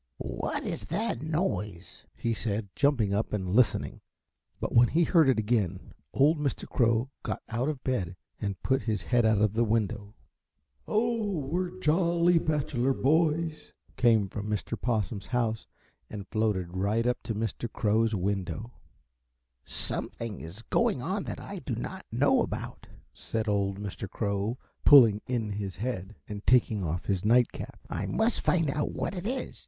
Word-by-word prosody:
"What - - -2
is 100 - -4
that 220 - -2
noise?" 150 - -3
he 115 - -1
said, 105 -2 -2
jumping 125 -9 +2
up 105 +2 0
and 95 -3 -2
listening; 125 0 +2 0.6
but - - -3
when 120 +1 +7
he 170 +7 +2
heard 160 -4 +5
it 130 - +3
again 105 -5 -1 0.2
old 150 +3 +3
Mr. 145 -2 -2
Crow 115 +2 +1
got - - -4
out 120 +5 0
of 145 -4 -4
bed 95 -9 -1 0.3
and 100 -3 -3
put 130 0 +2
his 110 -2 -2
head 120 -2 +3
out 110 -1 +4
of 105 -1 +3
the 115 +2 +2
window. 105 -2 -1 0.7
"Oh, 215 - 0
we 165 +7 -1
are 175 - -9
jolly 170 +1 +3
bachelor 135 -5 0
boys," 160 +2 +1 0.2
came 115 -5 +4
from 105 +2 -5
Mr. 105 +2 -2
Possum's 105 -5 -2
house 115 -3 -1 0.4
and 100 -2 -7
floated 95 -5 0
right 105 +5 +1
up 125 0 0
to 115 - -4
Mr. 115 +2 -3
Crow's 110 0 +2
window. 95 +2 -2 0.9
"Something 115 -3 -4
is 90 +8 -8
going - - +1
on - - -2
that - - -5
I - - -7
do - - -4
not - - -6
know - - +3
about," - - -5 0.3
said 110 0 -3
old 100 -1 +1
Mr. 100 -1 -6
Crow, 100 +3 -1 0.3
pulling 115 -8 +8
in 115 -4 -1
his 100 -3 -4
head 110 -2 -4
and 105 0 -6
taking 110 -5 +4
off 85 +1 -2
his 95 -3 0
night 120 +3 +4
cap. - - -8
"I - - -3
must 220 +2 +1
find 165 -5 +2
out 150 +1 -1
what - - -2
it 185 +1 -4
is. 255 +2 -3
115 Hz, 165 wpm, -29 LUFS, 100-140 Hz, 0.9 s, pulling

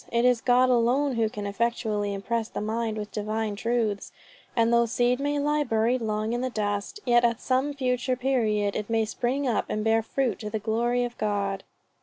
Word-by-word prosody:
It 235 +1 +2
is 250 -2 +3
God 250 +1 +4
alone 250 +4 +2
who 225 -2 +1
can 210 -1 -6
effectually 210 -1 -1
impress 220 +3 -2
the - - -5
mind 220 +1 -2
with 210 -1 -5
divine 215 0 -2
truths; 220 -2 -1 0.4
and 230 0 +3
though 235 0 +4
seed 245 +2 +1
may 290 +1 0
lie 295 +1 +1
buried 235 0 +1
long 215 0 -1
in 240 - -1
the 255 - -1
dust, 205 - -3
yet 240 -1 +4
at 235 -1 +2
some 270 +3 0
future 255 -1 0
period 220 -6 0
it 210 - -3
may 225 -1 +2
spring 255 +5 -1
up 235 - +1
and 215 - -1
bear 225 0 +3
fruit 245 -1 -1
to 210 - -5
the 220 - -2
glory 235 +3 0
of 240 0 -4
God." 200 -2 -1
230 Hz, 200 wpm, -26 LUFS, 215-250 Hz, 0.4 s, God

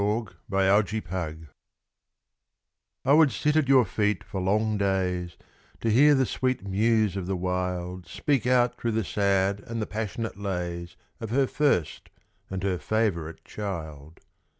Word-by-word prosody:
To 105 +2 0 0.2
Charles 95 +1 +3
Harpur 85 -6 -4 1.6
I 135 - +5
would 155 -2 +6
sit 150 0 0
at 155 -3 +3
your 130 -3 +6
feet 105 +1 0
for 95 - -5
long 105 +3 +1
days, 90 -3 -1 0.4
To 115 - +1
hear 145 +6 +6
the 135 -1 +3
sweet 130 -2 -1
Muse 105 0 +2
of 95 -2 -4
the 95 - -1
Wild 90 0 -3
Speak 135 -5 0
out 125 -1 +3
through 115 -1 0
the 110 0 0
sad 100 +1 +1
and 115 +3 -6
the 110 - -1
passionate 110 +1 -4
lays 90 -3 -4 0.2
Of 115 - -5
her 135 +4 +3
first 125 - 0 0.4
and 95 -1 -4
her 95 -3 0
favourite 85 -3 -1
Child. 80 -7 -7
100 Hz, 150 wpm, -26 LUFS, 90-115 Hz, 1.6 s, would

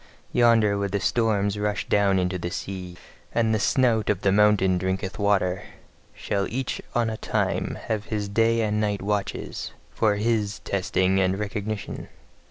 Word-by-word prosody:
Yonder 115 -4 +4
where 100 0 -1
the 100 +1 -1
storms 105 -2 +1
rush 105 0 -1
down 100 -2 +3
into 90 0 0
the 85 - -3
sea, 90 -1 -6 0.4
and 115 -1 +2
the 110 - +1
snout 115 -1 +2
of 100 -2 +1
the 95 - +3
mountain 100 -3 +4
drinketh 95 +2 -3
water, 100 -3 +1 0.5
shall 100 -1 -1
each 130 +2 -3
on 120 -1 +2
a 110 -1 -3
time - - -1
have 110 -2 -2
his 105 -2 -3
day 115 +3 +2
and 105 -1 0
night 105 -2 -1
watches, 100 -1 -3 0.2
for 110 -2 +2
HIS 105 -1 0
testing 95 0 +1
and 95 0 +2
recognition. 105 0 -4
105 Hz, 160 wpm, -25 LUFS, 95-110 Hz, 0.5 s, Yonder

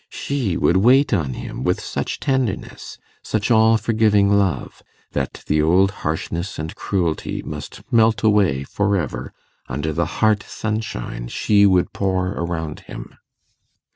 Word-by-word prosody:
She 125 -11 -2
would 85 - +3
wait 130 +8 +4
on 75 -10 0
him - - -6
with - - +1
such - - -4
tenderness, 130 -6 -2 0.2
such 110 +1 -1
all 110 0 +5
forgiving 110 -3 +3
love, 95 -8 -1 0.3
that 70 -2 -3
the 75 0 +2
old 90 +5 +4
harshness 85 +4 -3
and 80 +1 -5
cruelty 85 -5 -2
must 75 -1 -8
melt 110 -2 +4
away 100 -11 +3
for 100 +6 0
ever 80 -8 -4 0.4
under 75 +4 -2
the 85 +1 0
heart 110 -2 +3
sunshine 105 - -4
she 100 - +3
would 90 -2 +2
pour 95 -2 0
around 85 -4 -4
him. - - -8
95 Hz, 140 wpm, -21 LUFS, 80-110 Hz, 0.4 s, all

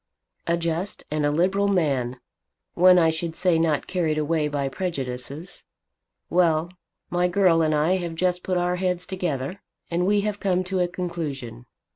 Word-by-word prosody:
"A 170 0 +2
just 170 +3 -3
and 150 -1 +1
a - - +2
liberal 185 +6 +2
man; 135 -10 0 0.5
one 180 +1 +6
I 165 -2 +4
should 160 0 -3
say 180 -3 +2
not 160 -3 +1
carried 165 -4 -1
away 155 0 +1
by 145 -2 -1
prejudices! 140 -2 -5 0.6
Well, 170 -1 +2 0.4
my 175 0 +2
girl 180 -2 +3
and 155 -1 +2
I 160 +5 +2
have 170 -2 -4
just 180 +1 0
put 185 -1 -1
our 180 0 0
heads 180 -1 -1
together, 180 -2 -3 0.3
and 175 +2 +1
we 205 0 +3
have 205 0 -2
come 185 -2 +1
to 185 0 -2
a 180 - +2
conclusion. 150 -10 -5
170 Hz, 165 wpm, -24 LUFS, 155-180 Hz, 0.6 s, one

